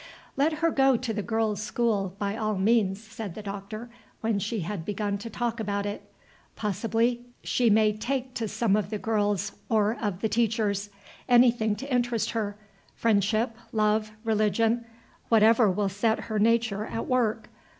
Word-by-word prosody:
"Let 290 Hz, +4 st, +2 dB
her 330 Hz, -, +4 dB
go 270 Hz, -3 st, +4 dB
to 235 Hz, -1 st, -3 dB
the 210 Hz, -, -2 dB
girls' 220 Hz, -1 st, -1 dB
school, 210 Hz, -4 st, 0 dB
by 200 Hz, 0 st, -2 dB
all 215 Hz, -2 st, -1 dB
means," 195 Hz, -1 st, +2 dB
said 220 Hz, -4 st, -7 dB
the 215 Hz, -, -7 dB
Doctor, 205 Hz, +4 st, -7 dB, 0.3 s
when 220 Hz, -2 st, 0 dB
she 210 Hz, +1 st, -2 dB
had 175 Hz, 0 st, -4 dB
begun 205 Hz, +1 st, -2 dB
to 230 Hz, -, -7 dB
talk 235 Hz, 0 st, -2 dB
about 200 Hz, -2 st, -2 dB
it. 205 Hz, 0 st, -6 dB, 0.4 s
"Possibly 225 Hz, +4 st, 0 dB, 0.2 s
she 245 Hz, -2 st, +2 dB
may 215 Hz, 0 st, +4 dB
take 255 Hz, +4 st, -3 dB
to 230 Hz, -2 st, -2 dB
some 210 Hz, -1 st, +1 dB
of 210 Hz, -2 st, -1 dB
the 215 Hz, -, -2 dB
girls 205 Hz, -2 st, 0 dB, 0.2 s
or 215 Hz, 0 st, +2 dB
of 205 Hz, -4 st, -2 dB
the 220 Hz, -, +2 dB
teachers. 215 Hz, -2 st, 0 dB, 0.4 s
Anything 240 Hz, -3 st, +4 dB
to 270 Hz, +5 st, -5 dB
interest 240 Hz, -2 st, +1 dB
her. 205 Hz, -3 st, -2 dB, 0.4 s
Friendship, 220 Hz, +1 st, +1 dB, 0.2 s
love, 215 Hz, 0 st, +1 dB
religion, 225 Hz, +1 st, +1 dB, 0.4 s
whatever 225 Hz, 0 st, +5 dB
will 200 Hz, +2 st, 0 dB
set 220 Hz, +3 st, 0 dB
her 215 Hz, -2 st, -2 dB
nature 225 Hz, -1 st, +2 dB
at 225 Hz, -, -4 dB
work. 230 Hz, -3 st, 0 dB
220 Hz, 160 wpm, -27 LUFS, 205-230 Hz, 0.4 s, whatever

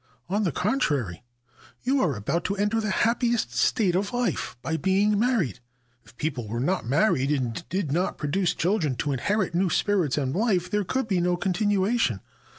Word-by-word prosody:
On 205 Hz, +3 st, +1 dB
the 175 Hz, -, +1 dB
contrary, 145 Hz, -, 0 dB, 0.6 s
you 265 Hz, +2 st, +2 dB
are 150 Hz, -6 st, +1 dB
about 140 Hz, -, -2 dB
to 200 Hz, -, 0 dB
enter 210 Hz, +3 st, +1 dB
the 215 Hz, -, -2 dB
happiest 235 Hz, +3 st, +1 dB
state 195 Hz, -6 st, +2 dB
of 195 Hz, +3 st, 0 dB
life, 245 Hz, -, -1 dB
by 160 Hz, +5 st, -1 dB
being 200 Hz, +4 st, +2 dB
married. 220 Hz, -, +1 dB, 0.4 s
If -, -, -20 dB
people 135 Hz, -7 st, -3 dB
were 115 Hz, +3 st, -3 dB
not 175 Hz, 0 st, -1 dB
married, 140 Hz, -, +2 dB
and 130 Hz, -1 st, -1 dB
did 185 Hz, -6 st, -2 dB
not 175 Hz, +5 st, 0 dB
pro 150 Hz, -, -3 dB
duce 180 Hz, 0 st, +1 dB
children 170 Hz, -7 st, 0 dB
to 145 Hz, +4 st, -2 dB
inherit 185 Hz, -, 0 dB
new 180 Hz, +2 st, +2 dB
spirits 180 Hz, -6 st, +1 dB
and 135 Hz, -2 st, -1 dB
life, 185 Hz, -4 st, +1 dB
there 210 Hz, 0 st, +1 dB
could 260 Hz, +6 st, -2 dB
be 190 Hz, -5 st, +1 dB
no 175 Hz, 0 st, +1 dB
continuation. 195 Hz, -, +1 dB
185 Hz, 180 wpm, -26 LUFS, 145-210 Hz, 0.6 s, you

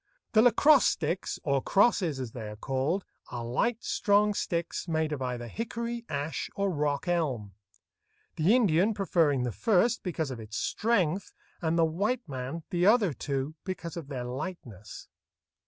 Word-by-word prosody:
The 215 Hz, -, +6 dB
lacrosse 250 Hz, +4 st, +6 dB
sticks, 165 Hz, +3 st, -1 dB
or 140 Hz, -2 st, +1 dB
crosses 185 Hz, -, +2 dB
as 125 Hz, -3 st, -4 dB
they 110 Hz, -3 st, -6 dB
are 105 Hz, -, -8 dB
called, 135 Hz, -, -1 dB, 0.2 s
are 120 Hz, -1 st, -5 dB
light, 225 Hz, -, 0 dB
strong 205 Hz, 0 st, +2 dB
sticks, 170 Hz, -2 st, -2 dB
made 160 Hz, -1 st, 0 dB
of 145 Hz, -3 st, -3 dB
either 125 Hz, -2 st, -3 dB
hickory, 235 Hz, -, -4 dB
ash, 145 Hz, +3 st, -3 dB
or 200 Hz, -1 st, 0 dB
rock 145 Hz, -2 st, -1 dB
elm; 135 Hz, -, -1 dB, 0.8 s
the 175 Hz, +9 st, +4 dB
Indian 205 Hz, -2 st, +3 dB
preferring 165 Hz, -9 st, +2 dB
the 120 Hz, -, -1 dB
first 215 Hz, -, +2 dB
because 160 Hz, -6 st, -3 dB
of 125 Hz, -, -6 dB
its 110 Hz, -1 st, -6 dB
strength, 200 Hz, -5 st, 0 dB, 0.3 s
and 165 Hz, 0 st, +1 dB
the 165 Hz, -, +5 dB
white 200 Hz, +8 st, -1 dB
man 135 Hz, +4 st, -5 dB
the 175 Hz, -1 st, +1 dB
other 205 Hz, -4 st, +4 dB
two 140 Hz, +2 st, -3 dB
because 170 Hz, -4 st, -5 dB
of 165 Hz, -5 st, -6 dB
their 130 Hz, -4 st, -4 dB
lightness. 125 Hz, -, -7 dB
165 Hz, 155 wpm, -29 LUFS, 135-200 Hz, 0.8 s, The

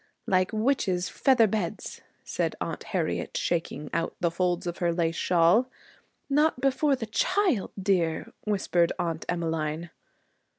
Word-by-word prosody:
'Like 185 Hz, 0 st, +2 dB
witches' 215 Hz, -6 st, 0 dB
feather 255 Hz, -4 st, +4 dB
beds,' 200 Hz, -5 st, -3 dB, 0.2 s
said -, -, -2 dB
Aunt -, -, -4 dB
Harriet, -, -, -2 dB
shaking 160 Hz, -3 st, -2 dB
out 165 Hz, 0 st, -1 dB
the 170 Hz, -1 st, +1 dB
folds 175 Hz, 0 st, 0 dB
of 175 Hz, -1 st, -4 dB
her 175 Hz, -1 st, +2 dB
lace 165 Hz, -1 st, 0 dB
shawl. 180 Hz, +9 st, +3 dB, 0.6 s
'Not 295 Hz, 0 st, +2 dB
before 275 Hz, +2 st, +2 dB
the 245 Hz, -3 st, -5 dB
child, 355 Hz, -, +1 dB
dear,' 180 Hz, -5 st, 0 dB
whispered 185 Hz, -5 st, +1 dB
Aunt 170 Hz, -3 st, -2 dB
Emmeline. 165 Hz, -1 st, -2 dB
180 Hz, 130 wpm, -27 LUFS, 170-230 Hz, 0.6 s, feather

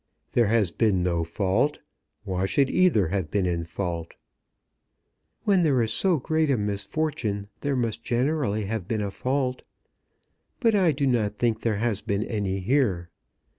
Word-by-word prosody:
"There 120 Hz, -3 st, +3 dB
has 105 Hz, -5 st, +2 dB
been 100 Hz, -4 st, +1 dB
no 85 Hz, -2 st, 0 dB
fault. 95 Hz, -, 0 dB, 0.5 s
Why 95 Hz, -2 st, -1 dB
should 135 Hz, +9 st, +2 dB
either 160 Hz, -, +3 dB
have 95 Hz, -4 st, -2 dB
been 100 Hz, +2 st, 0 dB
in 85 Hz, -2 st, -1 dB
fault?" 85 Hz, -1 st, -4 dB, 1.3 s
"When 195 Hz, -3 st, +3 dB
there 145 Hz, -6 st, +3 dB
is 110 Hz, -, -1 dB
so 185 Hz, -4 st, +3 dB
great 155 Hz, +2 st, 0 dB
a 135 Hz, -, +3 dB
misfortune 105 Hz, 0 st, -2 dB
there 140 Hz, -1 st, -1 dB
must 115 Hz, -2 st, -1 dB
generally 125 Hz, -4 st, 0 dB
have 105 Hz, -3 st, -3 dB
been 110 Hz, -2 st, -1 dB
a 100 Hz, -, -3 dB
fault. 130 Hz, +3 st, -1 dB, 1.0 s
But 230 Hz, -4 st, +3 dB
I 185 Hz, -5 st, +4 dB
do 140 Hz, 0 st, -1 dB
not 115 Hz, -6 st, +1 dB
think 115 Hz, -2 st, 0 dB
there 110 Hz, -3 st, 0 dB
has 110 Hz, -2 st, -1 dB
been 100 Hz, 0 st, -1 dB
any 100 Hz, -4 st, -2 dB
here. 95 Hz, -7 st, +1 dB
110 Hz, 160 wpm, -26 LUFS, 95-135 Hz, 1.3 s, I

